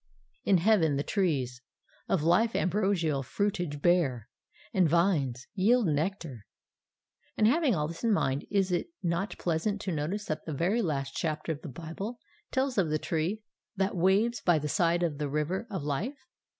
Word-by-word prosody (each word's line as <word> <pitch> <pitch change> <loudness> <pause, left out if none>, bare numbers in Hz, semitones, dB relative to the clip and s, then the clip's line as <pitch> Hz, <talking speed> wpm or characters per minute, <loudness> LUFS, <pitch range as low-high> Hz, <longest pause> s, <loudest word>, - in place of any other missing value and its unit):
In 195 - +5
heaven 170 -5 +3
the 140 - 0
trees 135 - -1 0.5
Of 180 -6 +1
life 185 +8 +3
ambrosial 180 -7 +1
fruitage 165 - -2
bear, 150 - +2 0.4
and 185 -6 +3
vines 150 -8 +1
Yield 220 +5 +3
nectar. 155 - -2 0.9
And, 215 - +4
having 270 - +3
all 150 -2 0
this 165 +5 -8
in 230 - +3
mind, 135 -8 0
is 195 -2 +1
it 180 - 0 0.2
not 175 +3 -1
pleasant 175 +5 -1
to 190 - -3
notice 170 +7 -2
that 155 0 -3
the 155 - -3
very 190 - +1
last 135 -7 -2
chapter 155 0 -2
of 155 -1 -5
the 165 - -7
Bible 170 - -6 0.3
tells 260 -4 0
of 175 -5 +2
the 155 - +1
tree 170 +8 -2 0.3
that 195 0 0
waves 200 +6 +2
by 175 -3 +4
the 150 0 -2
side 170 +1 +2
of 155 -4 -1
the 145 -1 -1
river 160 - -1
of 190 -8 -4
life? 175 - -2
175 Hz, 170 wpm, -29 LUFS, 150-200 Hz, 0.9 s, In